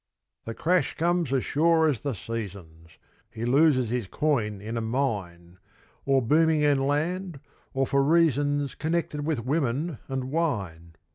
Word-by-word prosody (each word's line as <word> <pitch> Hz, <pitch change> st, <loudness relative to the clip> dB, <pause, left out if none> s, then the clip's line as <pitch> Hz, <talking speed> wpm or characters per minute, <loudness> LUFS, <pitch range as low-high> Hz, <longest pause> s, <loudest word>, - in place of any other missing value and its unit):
The 115 Hz, -, -5 dB
crash 180 Hz, +2 st, +1 dB
comes 170 Hz, -2 st, 0 dB
as 135 Hz, -2 st, 0 dB
sure 160 Hz, +1 st, +3 dB
as 140 Hz, -7 st, 0 dB
the 140 Hz, -2 st, -2 dB
seasons; 90 Hz, -7 st, -8 dB, 0.3 s
He 115 Hz, -, -5 dB
loses 130 Hz, -2 st, +3 dB
his 120 Hz, -5 st, -2 dB
coin 110 Hz, -7 st, -1 dB
in 110 Hz, +4 st, -6 dB
a 115 Hz, -, -1 dB
mine, 100 Hz, -8 st, -3 dB, 0.5 s
Or 135 Hz, -2 st, +3 dB
booming 155 Hz, +5 st, +3 dB
in 140 Hz, -2 st, +2 dB
land, 170 Hz, +3 st, -2 dB, 0.4 s
or 135 Hz, 0 st, +2 dB
for 140 Hz, +1 st, +2 dB
reasons 145 Hz, -3 st, +2 dB
Connected 160 Hz, -2 st, -2 dB
with 140 Hz, -8 st, -2 dB
women 145 Hz, +2 st, -1 dB
and 130 Hz, -1 st, -4 dB
wine. 95 Hz, -, -2 dB
135 Hz, 145 wpm, -26 LUFS, 115-155 Hz, 0.5 s, sure